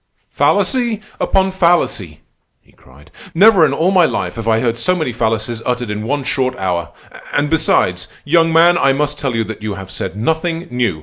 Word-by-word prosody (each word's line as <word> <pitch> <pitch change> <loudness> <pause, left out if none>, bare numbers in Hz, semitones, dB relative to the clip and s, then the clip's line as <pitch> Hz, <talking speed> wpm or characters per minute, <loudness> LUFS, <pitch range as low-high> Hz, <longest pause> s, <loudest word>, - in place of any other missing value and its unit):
"Fallacy 240 -5 +1 0.2
upon 190 0 +1
fallacy!" 170 - 0 0.4
he - - -28
cried. 70 +3 -20 0.2
"Never 190 -2 +6
in - - -3
all 175 +4 +1
my 185 -3 +4
life - - -2
have 115 -1 -6
I 110 0 +3
heard 115 -1 -1
so 180 +10 +1
many 155 -8 -2
fallacies 115 0 -2
uttered 125 -3 -2
in 105 0 -4
one 145 +1 -1
short 130 0 -1
hour. 90 -3 -2 0.5
And 145 +1 0
besides, 90 - +1 0.2
young 165 +2 +3
man, 170 +2 +4
I 135 -1 +3
must 145 +1 -1
tell 135 -4 -2
you 115 - 0
that 110 -1 -8
you 105 -2 -4
have 95 0 -9
said 95 0 -5
nothing 165 +7 -2
new. 120 -10 -1
130 Hz, 190 wpm, -16 LUFS, 110-165 Hz, 0.5 s, Never